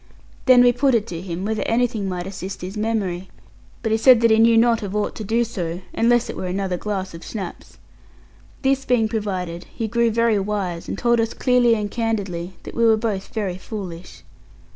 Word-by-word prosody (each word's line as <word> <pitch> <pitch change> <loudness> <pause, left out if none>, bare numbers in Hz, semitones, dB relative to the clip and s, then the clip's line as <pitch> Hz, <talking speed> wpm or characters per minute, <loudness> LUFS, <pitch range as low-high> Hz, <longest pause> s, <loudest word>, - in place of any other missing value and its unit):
Then 250 -1 +8
we 245 - +6
put 265 +1 +2
it 215 -2 +1
to 170 -1 -5
him, 180 0 -5
whether 220 0 -1
anything 230 -4 0
might 180 -1 -4
assist 190 0 -6
his 185 +3 -6
memory; 205 -4 -2 0.5
but 225 - 0
he 220 - +2
said 250 0 +7
that 230 -1 +4
he 220 - +5
knew 230 0 +5
not 230 0 +4
of 200 -1 -5
aught 210 - -1
to 220 - -5
do 230 +4 +1
so, 180 -6 -4
unless 240 +1 +3
it - - -6
were 185 - -4
another 190 0 -2
glass 190 -1 -4
of 165 - -10
schnapps. 195 -6 -7 0.9
This 270 0 +2
being 240 -4 +2
provided, 190 -6 -3
he 225 - -3
grew 235 +1 +2
very 230 -1 +2
wise, 195 -4 -3
and - - -4
told 235 +1 +2
us 225 0 -1
clearly 250 -2 +3
and 210 -2 -3
candidly 200 -6 -2
that - - -9
we 235 - 0
were 225 -1 +5
both 215 -4 -2
very 195 -5 -3
foolish. 185 -5 -8
215 Hz, 205 wpm, -22 LUFS, 190-230 Hz, 0.9 s, Then